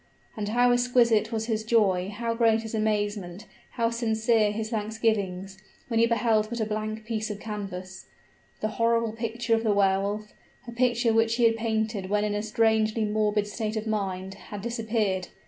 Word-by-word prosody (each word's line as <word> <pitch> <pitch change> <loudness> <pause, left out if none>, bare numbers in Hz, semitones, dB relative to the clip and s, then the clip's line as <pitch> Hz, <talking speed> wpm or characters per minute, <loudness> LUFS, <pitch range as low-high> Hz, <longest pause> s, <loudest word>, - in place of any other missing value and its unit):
And 210 -1 -3
how 245 +2 +4
exquisite 245 -3 +3
was 220 -1 -2
his 220 -2 -1
joy, 200 -5 +2
how 230 +2 -2
great 225 -1 +2
his 225 - -7
amazement, 205 -3 -1 0.3
how 230 -1 0
sincere 225 -1 +2
his 220 +1 -4
thanksgivings, 205 -4 -1 0.3
when 230 -1 +1
he 230 - +5
beheld 225 -2 +2
but 235 0 -4
a 220 - +1
blank 215 0 -4
piece 220 -1 -3
of 205 -1 -5
canvas. 195 -3 -7 0.5
The 215 - 0
horrible 230 -1 +2
picture 230 +1 -2
of 225 0 +2
the 220 - +2
Wehr 195 -1 +3
Wolf, 210 +2 -4 0.3
a - - -6
picture 240 -1 +2
which 225 0 +3
he 240 - +1
had 225 -1 +5
painted 220 -3 -2
when 210 0 +1
in 210 -1 -1
a 205 - -1
strangely 220 0 +1
morbid 210 0 +1
state 215 +1 -3
of 215 - -3
mind 195 -3 -2 0.2
had 205 -1 -6
disappeared. 220 -5 -1
220 Hz, 180 wpm, -27 LUFS, 210-230 Hz, 0.5 s, he